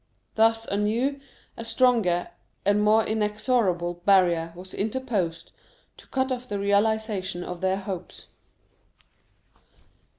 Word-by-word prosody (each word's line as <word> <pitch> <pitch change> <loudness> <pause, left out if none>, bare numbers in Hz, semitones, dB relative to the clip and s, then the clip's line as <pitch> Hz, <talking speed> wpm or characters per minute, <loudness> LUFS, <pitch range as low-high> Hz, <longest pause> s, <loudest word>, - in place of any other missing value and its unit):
Thus 225 0 +3
a 200 - -2
new, 235 +7 0 0.4
a 230 - -7
stronger, 225 -7 +2 0.4
and 205 +1 +3
more 215 +1 +4
inexorable 210 -5 0
barrier 175 -4 +3
was 185 +1 -10
interposed 200 -8 -2 0.5
to - - -15
cut 260 0 -1
off 250 0 -4
the 205 - -2
realization 200 -2 0
of 180 0 -7
their 190 0 +1
hopes. 190 -3 -7
205 Hz, 110 wpm, -26 LUFS, 185-225 Hz, 0.5 s, more